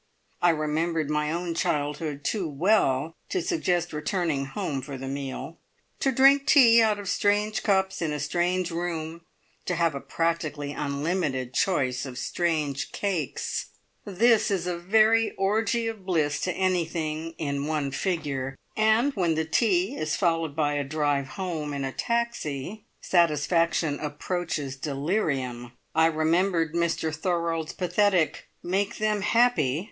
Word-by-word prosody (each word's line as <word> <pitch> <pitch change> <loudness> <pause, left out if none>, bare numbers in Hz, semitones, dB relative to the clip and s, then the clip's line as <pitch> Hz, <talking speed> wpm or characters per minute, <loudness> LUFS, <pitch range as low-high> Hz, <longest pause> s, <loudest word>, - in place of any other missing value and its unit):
I 175 - +5
remembered 155 0 0
my 150 0 0
own 170 +1 -2
childhood 150 -2 -2
too 190 -3 -1
well 150 -2 +2 0.2
to 375 - 0
suggest 180 - 0
returning 150 -2 -1
home 145 -3 -3
for 135 +1 -7
the 135 +1 -6
meal. 140 +4 -5 0.4
To 270 - +2
drink 275 +2 +5
tea 235 -6 +7
out 215 -2 +3
of 205 -1 -7
strange 205 +2 +1
cups, 190 -2 +1
in 160 -2 0
a 150 - -3
strange 175 +4 0
room, 165 -1 -4 0.4
to 180 - -1
have 165 -2 +2
a 140 - -5
practically 160 -3 -2
unlimited 145 -3 -2
choice 135 -9 0
of 125 -1 -8
strange 150 -3 -1
cakes 180 - -2 0.4
this 220 +3 +3
is 190 -4 -1
a 180 -1 -1
very 220 +5 +3
orgie 220 +4 +1
of 220 -4 -5
bliss 155 -6 0
to 185 - -1
anything 165 -3 -1
"in 140 -2 -2
one 150 -3 -1
figure," 140 -7 -2 0.2
and 220 +6 +3
when 175 -7 +1
the 160 0 0
tea 185 +2 +1
is 155 -1 -1
followed 165 -5 0
by 150 -2 +1
a 145 -1 0
drive 145 -1 0
home 165 -6 -3
in 140 - -3
a 135 - -3
taxi, 220 - -3
satisfaction 165 -2 +2
approaches 150 -2 -3
delirium. 135 - -2 0.2
I 160 0 +5
remembered 165 +1 +1
Mr 170 -2 0
Thorold's 165 -1 -1
pathetic 180 -2 +1
"Make 195 +4 -1
them 215 -1 0
happy!" 200 - +3
165 Hz, 140 wpm, -26 LUFS, 150-190 Hz, 0.4 s, tea